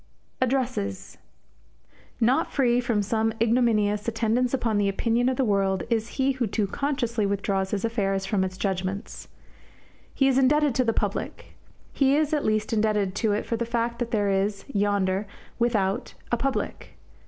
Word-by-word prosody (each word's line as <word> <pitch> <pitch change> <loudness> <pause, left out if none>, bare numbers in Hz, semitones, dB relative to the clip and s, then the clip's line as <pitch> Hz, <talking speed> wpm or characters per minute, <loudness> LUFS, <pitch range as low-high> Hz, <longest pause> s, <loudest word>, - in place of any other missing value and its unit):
ADDRESSES 250 - -2 1.0
Not 245 +3 +2
free 245 -3 +2
from 230 -4 0
some 220 +2 0
ignominious 220 -3 +2
attendance 230 +2 +1
upon 230 -5 0
the 200 -1 +2
opinion 230 +5 +1
of 260 - -2
the 265 - +2
world 195 -3 +1
is 225 -1 +1
he 270 0 +2
who 255 -3 -1
too 210 +1 0
consciously 240 -1 -1
withdraws 195 -1 -1
his 205 +1 -1
affairs 195 -4 -1
from 195 -1 +1
its 185 0 -4
judgements. 190 +1 -3 0.8
He 270 - +2
is 265 -1 +3
indebted 290 +1 +3
to 255 - +2
"the 230 - +2
public." - - -3 0.4
He 275 0 +3
is 305 0 +1
at 295 - +1
least 215 +1 0
indebted 210 -3 +1
to 220 -2 +1
it 210 - -1
for 230 - -2
the 235 - -1
fact 235 0 -2
that 240 -2 -2
there 205 -3 +1
is, 195 +1 -1
yonder, 200 -1 +1 0.3
without, 230 -1 0 0.2
a - - +4
public. 265 +3 -3
225 Hz, 165 wpm, -25 LUFS, 200-245 Hz, 1.0 s, a